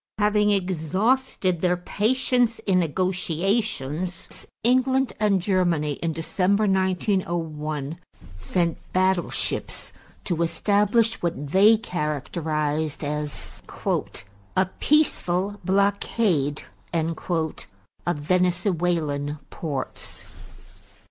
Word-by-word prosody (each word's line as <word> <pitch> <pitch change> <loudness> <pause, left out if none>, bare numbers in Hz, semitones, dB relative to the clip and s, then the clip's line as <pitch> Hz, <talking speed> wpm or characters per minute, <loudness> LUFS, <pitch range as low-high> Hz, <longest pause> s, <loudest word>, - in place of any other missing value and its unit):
Having 210 0 +3
exhausted 190 - +1
their 180 -1 +2
patience 235 +5 +1
in 185 -2 +3
negotiations, 180 - -1 0.2
England 255 +2 +3
and 205 -3 +3
Germany, 175 -5 +1
in 165 - 0
December 185 +6 +1
1901, 170 -6 -1 0.4
sent 165 - -1
battleships 185 -1 0 0.3
to 170 -3 -1
establish 210 +6 +2
what 150 -5 -3
they 210 +5 +6
characterized 155 -3 -2
as 150 0 -4 1.1
"a 190 - +5
peaceful 205 - +2
blockade" 190 -5 +1 0.3
of 165 +1 -1 0.8
Venezuelan 170 -3 0
ports. 140 -5 -5
180 Hz, 75 wpm, -24 LUFS, 160-205 Hz, 1.1 s, they